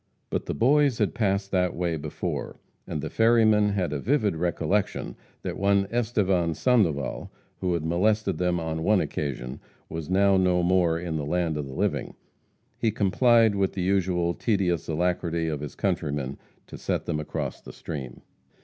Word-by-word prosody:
But - - -2
the - - -2
boys 140 - +3
had 105 - +1
passed 100 -3 0
that 90 -2 +1
way 85 -1 -1
before, 75 -1 -4 0.3
and 75 - -4
the - - -3
ferryman 110 -2 +4
had 90 -6 -1
a 75 - -2
vivid 110 - +1
recollection 85 -3 -1 0.3
that - - -4
one 100 0 +3
Estevan 100 -8 +1
Sandoval, 85 - +1 0.3
who 90 -2 0
had 80 -2 -3
molested 95 +2 +1
them 90 -1 +1
on 80 -1 -3
one 105 +4 +3
occasion, 65 -6 -3 0.3
was 80 -1 -5
now 100 +1 +4
no 90 -1 +2
more 90 -2 +3
in 85 -2 -3
the 75 - -3
land 85 -1 0
of 75 -2 -3
the 65 - -8
living. - - -1 0.6
He 115 - +2
complied 110 +2 +4
with 100 -1 0
the 95 - -2
usual 90 -2 +1
tedious 90 -6 0
alacrity 85 0 0
of 75 -2 -2
his 75 -2 -7
countrymen 75 -8 -2 0.3
to - - -10
set - - -2
them 75 - -1
across 75 - -4
the - - -10
stream. 65 -6 -7
90 Hz, 165 wpm, -26 LUFS, 80-100 Hz, 0.6 s, ferryman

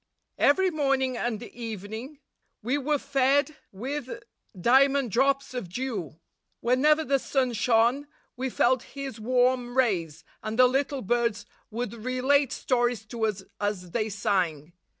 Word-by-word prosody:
Every 370 +6 +4
morning 270 -4 +1
and 235 -2 -2
evening 230 +5 -7 0.4
we 250 +5 0
were 295 +2 +1
fed 280 +2 +1 0.2
with 260 +6 -5 0.4
diamond 265 +3 +4
drops 275 +3 +1
of 240 -9 -5
dew. 195 - -4 0.4
Whenever 295 +6 +3
the 275 -2 +1
sun 260 -2 0
shone, 235 +5 +2 0.3
we 260 +1 -2
felt 250 0 +2 0.2
his 270 -5 -5
warm 250 +1 +1
rays, 170 - 0 0.2
and 215 +1 -4
the 255 - +7
little 270 +1 0
birds 230 -1 0 0.2
would 235 0 -4
relate 255 +4 +1
stories 240 -3 0
to 225 -2 0
us 200 -2 -4 0.2
as 205 -4 -3
they 220 +1 -1
sang. 180 -7 -1
245 Hz, 130 wpm, -27 LUFS, 215-270 Hz, 0.4 s, the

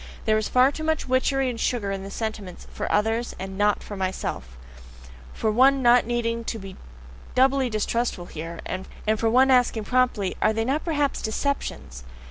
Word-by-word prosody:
There 215 - +3
is 215 - -3
far 255 +2 +5
too 315 - -6
much 315 -2 -1
witchery 260 +1 +1
and 240 -2 -3
sugar 220 -6 -1
in 195 -1 -3
the 195 - -7
sentiments 210 -3 -5
"for - - -3
others" 225 +3 0
and 190 +1 -6
"NOT 205 +1 +1
for 205 - -7
myself," 185 - -4 0.7
for 220 - -1
one 265 +4 +4
not 240 -1 +5
needing 230 -1 -1
to 225 - -3
be 195 -2 -9 0.6
doubly 265 0 +3
distrustful 215 -3 -1
here, 165 +1 -7
and 185 +1 -5 0.3
for 225 +1 +1
one 260 +3 +5
asking 245 -3 +3
promptly: 245 -5 +1
"Are 215 - +3
they 225 +1 -1
not 280 +5 0
perhaps 290 -4 0
DECEPTIONS?" 220 - -3
230 Hz, 175 wpm, -24 LUFS, 200-255 Hz, 0.7 s, far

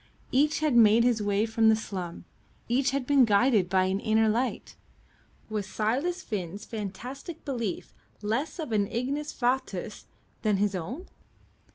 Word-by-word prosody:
Each 295 +4 +2
had 305 -5 +2
made 225 0 +6
his 240 -3 +2
way 205 +1 +1
from 225 0 +3
the 220 - +6
slum, 185 -6 -6 0.4
each 255 +3 +2
had 275 0 -2
been 280 0 +5
guided 210 -3 +3
by 185 0 +3
an 190 +1 0
inner 220 +1 +2
light 235 +4 -1 0.7
was 210 -2 -3
Silas 255 - -1
Finn's 200 -2 -5
fantastic 245 - -7
belief 235 -9 -3 0.3
less 230 - -1
of 310 -8 -5
an 205 -2 +2
ignis 280 +7 -2
fatuus 255 +1 -2 0.3
than 210 -3 +2
his 205 0 +1
own? 220 - -5
225 Hz, 150 wpm, -28 LUFS, 205-265 Hz, 0.7 s, made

